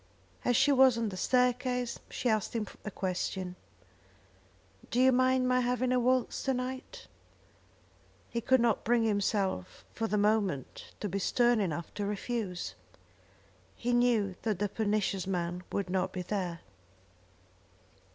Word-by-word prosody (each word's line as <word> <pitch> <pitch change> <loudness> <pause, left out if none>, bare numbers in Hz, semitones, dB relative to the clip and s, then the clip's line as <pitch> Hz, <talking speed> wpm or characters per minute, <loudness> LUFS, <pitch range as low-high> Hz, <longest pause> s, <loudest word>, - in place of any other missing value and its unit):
As 245 - +2
she 270 +2 +4
was 260 -3 +6
on 230 -2 0
the 190 - -6
staircase 250 +2 +1
she 255 - -3
asked 215 0 0
him 220 -2 0 0.2
a - - -4
question. 185 -1 -3 1.3
"Do 245 - 0
you 260 +1 +6
mind 255 0 +3
my 250 0 +3
having 250 0 0
a 255 - +3
waltz 255 0 +1
to 265 -1 0
night?" 260 - -5 1.2
He 235 - -3
could 260 +3 +4
not 230 -3 +2
bring 235 0 +3
himself 200 - -1
for 225 - -2
the 210 - 0
moment 205 - 0
to 210 - -1
be 200 +1 -2
stern 240 +3 +3
enough 170 -4 -3
to 205 - -3
refuse. 205 -3 -3 1.0
He 245 +1 -1
knew 235 -5 +3
that 215 -4 -1
the 205 +2 -1
pernicious 205 -3 -1
man 175 -1 -2
would 200 -2 -1
not 185 0 -1
be 185 - -3
there. 180 -4 -3
225 Hz, 145 wpm, -31 LUFS, 195-250 Hz, 1.3 s, was